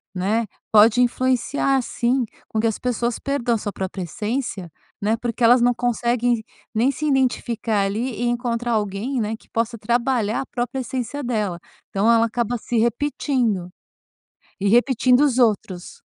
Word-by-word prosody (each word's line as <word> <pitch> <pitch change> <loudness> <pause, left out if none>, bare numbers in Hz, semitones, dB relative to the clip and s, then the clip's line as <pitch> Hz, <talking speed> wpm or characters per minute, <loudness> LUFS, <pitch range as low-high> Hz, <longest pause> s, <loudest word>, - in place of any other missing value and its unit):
né, 210 +5 0 0.3
pode 220 +3 +6
influenciar 260 +2 +1
sim, 245 +2 0 0.2
com 220 - -2
que 225 - +1
as 220 - -2
pessoas 240 -1 -1
percam 245 -4 0
sua 205 -1 -4
própria 190 -1 -4
essência, 210 - -4 0.3
né, 215 +2 +2
porque 240 +1 -3
elas 240 +2 +6
não 245 +1 +4
conseguem 240 -1 0 0.3
nem 235 +5 +2
se 305 +3 -4
identificar 240 -6 +1
ali 225 +6 -2
e - - +1
encontrar 240 0 -1
alguém, 215 +5 -1
né, 215 +1 -2
que - - -24
possa 230 +1 -1
trabalhar 235 0 0
a - - -5
própria 250 +2 -3
essência 260 +3 -4
dela. 210 -8 -2 0.3
Então 205 +4 +2
ela 230 0 +4
acaba 235 +1 -1
se 235 +1 -3
repetindo 235 -5 0 0.9
e 200 - +1
repetindo 250 +2 +4
os 280 -4 +3
outros. 205 -6 0
235 Hz, 150 wpm, -22 LUFS, 215-250 Hz, 0.9 s, pode